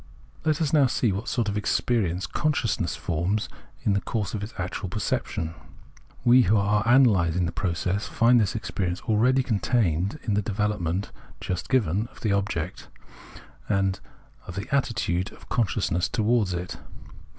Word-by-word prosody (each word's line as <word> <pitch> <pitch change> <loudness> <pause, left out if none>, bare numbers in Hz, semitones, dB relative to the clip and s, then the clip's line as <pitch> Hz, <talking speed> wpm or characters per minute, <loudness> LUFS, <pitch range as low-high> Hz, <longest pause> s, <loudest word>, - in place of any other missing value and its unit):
Let 155 0 +1
us 150 - -1
now 145 -4 +5
see 120 -3 +1
what 100 +5 -4
sort 120 -4 0
of 100 - -1
experience 100 -3 0
consciousness 155 -1 0
forms 90 +6 -1 0.4
in 100 - +2
the 100 - +1
course 105 -4 -3
of 105 - -3
its 105 +3 -7
actual 90 +1 -4
perception. 85 -4 -2 0.7
We, 125 +1 +7
who 110 -1 +3
are 105 +1 +2
analysing 95 -9 +4
the 85 - -2
process, 90 +3 -1
find 120 +1 +4
this 100 0 0
experience 90 -5 -2
already 125 +5 +3
contained 105 - 0
in 110 - -1
the 105 - +2
development 100 -3 -1 0.3
(just 90 -1 -4
given) 110 -4 +1
of 135 - -18
the 110 - 0
object 95 -4 -2 0.8
and 95 -1 +1 0.5
of 90 - -7
the 100 +4 -4
attitude 100 -8 0
of - - -17
consciousness 95 -6 0
towards 110 -4 +1
it. 90 +1 -5
105 Hz, 150 wpm, -26 LUFS, 90-115 Hz, 0.8 s, We